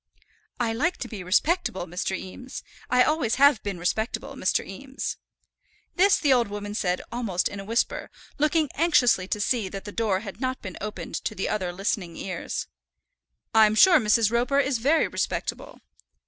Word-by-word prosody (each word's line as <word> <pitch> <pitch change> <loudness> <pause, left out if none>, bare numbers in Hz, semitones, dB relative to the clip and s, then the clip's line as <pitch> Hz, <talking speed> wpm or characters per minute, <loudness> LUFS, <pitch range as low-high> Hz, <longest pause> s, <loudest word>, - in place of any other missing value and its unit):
"I 230 -2 0
like 320 +10 0
to 240 - -5
be 210 -5 -7
respectable, 205 - +1
Mr. 180 +2 -3
Eames. 250 +7 -8 0.3
I 250 0 +5
always 295 -7 +1
have 280 -4 +5
been 200 -3 -4
respectable, 220 +6 -2
Mr. - - 0
Eames." - - -5 0.8
This 395 +2 +5
the 285 -4 +3
old 240 -3 +3
woman 205 0 -6
said 180 -3 -1
almost 225 -7 -1
in 205 - -7
a - - -6
whisper, 230 +4 -1 0.3
looking 305 0 +2
anxiously 270 - +3
to 210 - -2
see 210 -1 0
that 195 +1 -7
the 205 - -6
door 205 -4 0
had 200 +1 -9
not 260 0 -1
been 185 -2 -8
opened 210 +1 -5
to 205 -3 -2
other 185 -4 -1
listening 180 -2 -3
ears. 185 -2 -4 0.9
"I'm 215 -1 +5
sure 360 +10 +7
Mrs. 215 -1 +3
Roper 245 +4 +1
is 265 -3 +1
very 290 +7 +3
respectable." - - -3
220 Hz, 165 wpm, -25 LUFS, 195-260 Hz, 0.9 s, sure